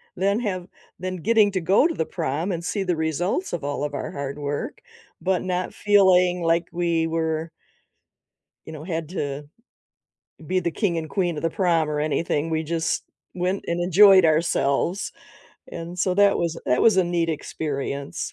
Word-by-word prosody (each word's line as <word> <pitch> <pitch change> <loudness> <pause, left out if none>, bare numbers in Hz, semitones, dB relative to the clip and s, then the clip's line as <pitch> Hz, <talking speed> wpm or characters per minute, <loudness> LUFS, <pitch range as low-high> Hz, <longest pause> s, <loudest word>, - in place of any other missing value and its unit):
then 200 +4 +1
have 185 -6 -3 0.3
then 185 0 -4
getting 215 +3 +3
to 190 -2 -1
go 195 - +4
to 335 - -3
the 160 - -1
prom 165 +2 -2
and 170 0 -4
see 200 +2 -2
the 180 -3 0
results 165 - -1
of 170 - -3
all 145 0 -2
of 145 -1 -3
our 145 - -4
hard 140 -2 -5
work 145 0 -4 0.4
but 185 -1 +1
not 185 0 -2
feeling 185 -3 +4
like 165 +1 +2
we 170 -1 0
were 160 0 -1 1.2
you - - -7
know, 155 -1 -8
had 165 -3 -3
to 145 -5 -4 1.0
be 185 +2 +1
the 170 -1 -1
king 180 -2 -1
and 155 -2 -5
queen 175 -2 0
of 150 - -5
the 165 - +1
prom 170 -5 +1
or 150 - -2
anything, 155 0 -1
we 160 0 0
just 165 +1 -1 0.3
went 185 +2 -1
and 170 +1 -1
enjoyed 190 +1 +7
ourselves, 160 +2 +1 0.6
and 170 +2 -7
so 185 0 +1
that 200 +1 +4
was 170 -1 -1
that 125 - +2
was 220 -4 +5
a 190 - +5
neat 170 -1 0
experience. 140 -3 -4
170 Hz, 175 wpm, -24 LUFS, 160-185 Hz, 1.2 s, enjoyed